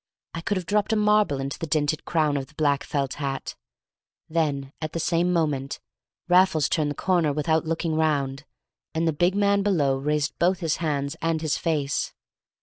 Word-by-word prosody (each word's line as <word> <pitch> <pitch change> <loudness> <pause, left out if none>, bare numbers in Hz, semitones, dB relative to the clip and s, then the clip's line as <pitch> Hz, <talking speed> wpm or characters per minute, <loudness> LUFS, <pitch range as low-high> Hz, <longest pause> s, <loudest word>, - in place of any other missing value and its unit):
I 165 - -4
could 205 +3 -1
have 180 - -4
dropped 210 +4 +1
a - - +3
marble 210 -8 +3
into 135 +1 -4
the 165 - -3
dinted 150 +1 0
crown 155 -3 +1
of 135 -1 -2
the 160 - -22
black 145 -2 +1
felt 140 -2 -2
hat. 135 -1 -3 0.7
Then, 145 -4 -1
at 155 -1 -4
the 165 - -2
same 170 +2 +1
moment, 150 -5 -1 0.5
Raffles 180 -4 +4
turned 155 -2 0
the 145 - -4
corner 175 -5 +1
without 160 +2 +1
looking 165 0 -1
round, 145 -3 0 0.5
and 165 +1 +1
the 160 - +2
big 175 +5 +2
man 200 0 +3
below 150 -10 +1
raised 150 +1 0
both 180 +2 +3
his 165 -4 0
hands 145 -2 -2
and 165 -1 0
his 155 - +1
face. 150 -4 -1
155 Hz, 185 wpm, -25 LUFS, 145-170 Hz, 0.7 s, Raffles